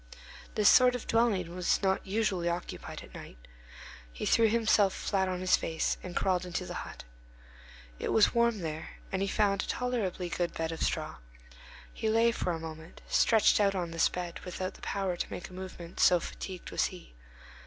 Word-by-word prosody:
This 210 Hz, -1 st, +4 dB
sort 250 Hz, -1 st, +7 dB
of 250 Hz, -, -5 dB
dwelling 200 Hz, -7 st, +1 dB
is 180 Hz, -, +1 dB
not 190 Hz, 0 st, +1 dB
usually 190 Hz, -4 st, 0 dB
occupied 170 Hz, +1 st, -5 dB
at -, -, -15 dB
night. -, -, -10 dB, 0.7 s
He -, -, -5 dB
threw 225 Hz, -1 st, +4 dB
himself 215 Hz, -3 st, +3 dB
flat 190 Hz, -2 st, 0 dB
on 180 Hz, -1 st, -3 dB
his 185 Hz, -, +4 dB
face, 160 Hz, -1 st, -1 dB
and 180 Hz, -1 st, -8 dB
crawled 185 Hz, -2 st, +1 dB
into 180 Hz, -2 st, -4 dB
the -, -, -6 dB
hut. -, -, -9 dB, 1.0 s
It -, -, -2 dB
was 220 Hz, -, +4 dB
warm 235 Hz, -3 st, +2 dB
there, 160 Hz, -1 st, -6 dB
and 190 Hz, -, -1 dB
he 195 Hz, -, +1 dB
found 200 Hz, -1 st, +2 dB
a -, -, -6 dB
tolerably 225 Hz, -8 st, -2 dB
good 175 Hz, 0 st, -2 dB
bed 160 Hz, 0 st, -2 dB
of 165 Hz, -, -6 dB
straw. -, -, -1 dB, 0.8 s
He 220 Hz, -, -2 dB
lay, 230 Hz, +1 st, +4 dB
for 185 Hz, -, -2 dB
a 165 Hz, -, -3 dB
moment, 160 Hz, +1 st, -9 dB
stretched 220 Hz, -2 st, +4 dB
out 200 Hz, -1 st, +3 dB
on 175 Hz, -3 st, -2 dB
this 165 Hz, 0 st, +3 dB
bed, 175 Hz, -1 st, -5 dB
without 185 Hz, +1 st, -5 dB
the -, -, -16 dB
power 195 Hz, -3 st, -2 dB
to -, -, -4 dB
make 180 Hz, -, -6 dB
a -, -, -14 dB
movement, 185 Hz, -2 st, -8 dB
so 180 Hz, -, +6 dB
fatigued 185 Hz, +1 st, -7 dB
was -, -, +1 dB
he. 180 Hz, -, -8 dB
185 Hz, 190 wpm, -30 LUFS, 175-215 Hz, 1.0 s, sort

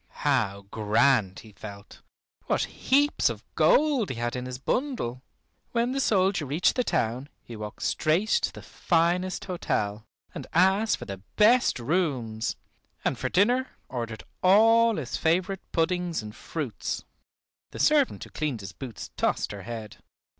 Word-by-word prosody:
How 110 Hz, -9 st, +1 dB
grand 110 Hz, -2 st, +2 dB
he 110 Hz, -, -15 dB
felt! 100 Hz, +1 st, -11 dB, 0.5 s
What -, -, +1 dB
heaps 285 Hz, +3 st, +2 dB
of -, -, -6 dB
gold 285 Hz, -8 st, +3 dB
he 130 Hz, -, -3 dB
had 120 Hz, +1 st, -2 dB
in 125 Hz, 0 st, -4 dB
his 125 Hz, 0 st, -5 dB
bundle! 135 Hz, -, -2 dB, 0.5 s
When 235 Hz, +1 st, +1 dB
the 270 Hz, -, -1 dB
soldier 195 Hz, -, +2 dB
reached 150 Hz, +6 st, +2 dB
the 250 Hz, -, +1 dB
town 125 Hz, -, -1 dB
he 120 Hz, -, -9 dB
walked 105 Hz, -1 st, -7 dB
straight 170 Hz, +8 st, +1 dB
to -, -, +2 dB
the -, -, -11 dB
finest 175 Hz, +2 st, 0 dB
hotel, 110 Hz, -, -2 dB, 0.3 s
and -, -, -7 dB
asked 190 Hz, +6 st, +3 dB
for -, -, -8 dB
the 100 Hz, -2 st, -7 dB
best 235 Hz, +4 st, +5 dB
rooms, 120 Hz, -7 st, -1 dB, 0.5 s
and -, -, +1 dB
for -, -, -3 dB
dinner 245 Hz, +7 st, +2 dB
ordered 115 Hz, -3 st, -5 dB, 0.2 s
all 225 Hz, +4 st, +5 dB
his 140 Hz, -9 st, -3 dB
favorite 180 Hz, +4 st, +1 dB
puddings 170 Hz, -4 st, 0 dB
and 105 Hz, 0 st, -9 dB
fruits. 140 Hz, -11 st, -4 dB, 0.7 s
The -, -, -10 dB
servant 295 Hz, -3 st, +3 dB
who -, -, -12 dB
cleaned 145 Hz, -8 st, -2 dB
his 95 Hz, -1 st, -8 dB
boots 125 Hz, -6 st, -8 dB
tossed -, -, 0 dB
her 100 Hz, -, -7 dB
head. 110 Hz, +1 st, -7 dB
155 Hz, 150 wpm, -27 LUFS, -, 0.7 s, best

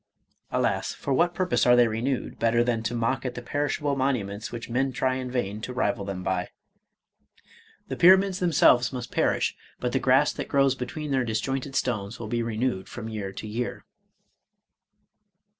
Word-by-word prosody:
— -, -, -45 dB
(Alas! -, -, 0 dB
for 140 Hz, -, -2 dB
what 170 Hz, +5 st, +2 dB
purpose 180 Hz, -11 st, +1 dB
are 125 Hz, -, +7 dB
they 120 Hz, -1 st, +5 dB
re 110 Hz, 0 st, -3 dB
newed, 130 Hz, 0 st, -2 dB
better 115 Hz, +1 st, +3 dB
than 120 Hz, -2 st, 0 dB
to 115 Hz, +2 st, -3 dB
mock 120 Hz, +2 st, 0 dB
at 125 Hz, -2 st, -4 dB
the 125 Hz, -, -5 dB
perishable 145 Hz, +1 st, -1 dB
monuments 115 Hz, -7 st, -2 dB
which 120 Hz, 0 st, -6 dB
men 130 Hz, +3 st, 0 dB
try 130 Hz, +1 st, 0 dB
in 130 Hz, -1 st, -4 dB
vain 110 Hz, -4 st, -2 dB
to 125 Hz, -, -5 dB
rival 100 Hz, -5 st, 0 dB
them 95 Hz, -2 st, -5 dB
by.) 95 Hz, -1 st, -1 dB, 1.4 s
The -, -, -4 dB
pyra 185 Hz, +2 st, +8 dB
mids 190 Hz, -1 st, -2 dB
themselves 145 Hz, -8 st, +4 dB
must 125 Hz, -3 st, -6 dB
perish, -, -, +1 dB, 0.2 s
but 125 Hz, -, -1 dB
the -, -, +1 dB
grass 130 Hz, +3 st, +3 dB
that -, -, -5 dB
grows 135 Hz, -2 st, +3 dB
between 140 Hz, +4 st, -5 dB
their 130 Hz, -2 st, +2 dB
disjointed 130 Hz, +4 st, -2 dB
stones 110 Hz, -4 st, -2 dB
will 115 Hz, -, -5 dB
be 120 Hz, +2 st, -1 dB
renewed 115 Hz, -3 st, -2 dB
from 115 Hz, -2 st, -6 dB
year 105 Hz, -3 st, -4 dB
to 110 Hz, -, -7 dB
year. 120 Hz, +3 st, -4 dB
125 Hz, 185 wpm, -26 LUFS, 110-135 Hz, 1.4 s, pyra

